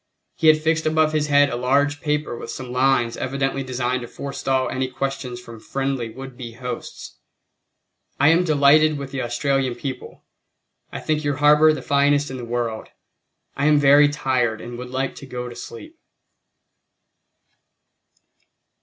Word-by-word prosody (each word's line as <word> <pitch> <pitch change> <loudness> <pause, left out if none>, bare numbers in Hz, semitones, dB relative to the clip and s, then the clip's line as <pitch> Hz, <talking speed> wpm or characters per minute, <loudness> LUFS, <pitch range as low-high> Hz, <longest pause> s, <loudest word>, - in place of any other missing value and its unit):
He 160 - +1
had 155 0 +7
fixed 160 0 0
above 155 0 +2
his 150 -1 0
head 145 -1 +4
a - - -2
large 140 +4 +1
paper 150 -4 -1
with - - -8
some 125 -2 -7
lines 125 -2 +2
evidently 135 +1 -2
designed 130 -1 -2
to 120 - -7
forestall 135 0 -2
any 130 0 -2
questions 130 -1 -4
from 115 -2 -12
friendly 135 -1 -3
would 130 +2 -10
be 120 -2 -8
hosts: 125 0 -8 1.0
"I 140 +2 +5
am 165 +2 +4
delighted 155 -1 +4
with 140 -1 -7
the 135 -1 -3
Australian 130 +1 -1
people. 130 0 -7 0.7
I - - -5
think 155 0 -1
your 145 -1 0
harbor 150 +2 +5
the 155 - -4
finest 145 0 +2
in 130 - -5
the 125 - -7
world. 115 -2 -3 0.7
I 140 +2 0
am 150 -1 +5
very 145 +1 +6
tired 125 -6 0
and 120 +1 -8
would 125 0 -7
like 130 +1 -2
to 140 - -10
go 125 -1 -5
to 120 - -9
sleep." 315 - -10
135 Hz, 160 wpm, -22 LUFS, 125-145 Hz, 1.0 s, had